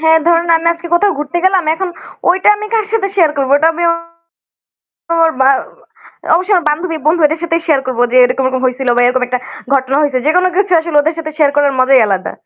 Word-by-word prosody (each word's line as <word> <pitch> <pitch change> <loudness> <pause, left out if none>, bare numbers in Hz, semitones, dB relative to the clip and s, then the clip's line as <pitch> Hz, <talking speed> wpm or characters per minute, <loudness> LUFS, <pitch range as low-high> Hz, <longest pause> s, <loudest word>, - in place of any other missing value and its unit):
হ্যাঁ, 320 0 +3
ধরুন 340 0 +2
আমি 330 +1 -4
আজকে 335 +1 -10
কোথাও 390 -2 +1
ঘুরতে 300 +4 -3
গেলাম, 375 -3 +2
এখন 380 +1 -4 0.4
ওইটা 375 +3 +1
আমি 425 - -7
কার 440 - +1
সাথে 400 -3 0
শেয়ার 330 -5 +3
করব? 270 -1 -2
ওটা 320 +2 +2
আমি 345 - -4 1.4
...ওর 320 - +1
বা 265 - +4 0.9
অবশ্যই 370 +4 +1
আমার 340 -4 +1
বান্ধবী, 325 +2 -3
বন্ধু 330 +2 +2
এদের 315 +2 -4
সাথেই 335 0 -1
শেয়ার 300 -5 +2
করবো 245 -2 -1
যে, - - +1
এরকম 255 +1 -1
এরকম 260 0 -3
হইসিল 255 0 -3
বা 245 - +3
এরকম 250 0 0
একটা 250 0 -2 0.4
ঘটনা 265 0 0
হইসে। 275 -3 0
যেকোনো 360 +4 +2
কিছু 395 -2 0
আসলে 325 -2 -4
ওদের 315 +2 -2
সাথে 310 -1 -5
শেয়ার 290 -2 +2
করার 285 -1 +2
মজাই 255 -2 +4
আলাদা। 190 -2 -3
315 Hz, 210 wpm, -13 LUFS, 265-345 Hz, 1.4 s, বা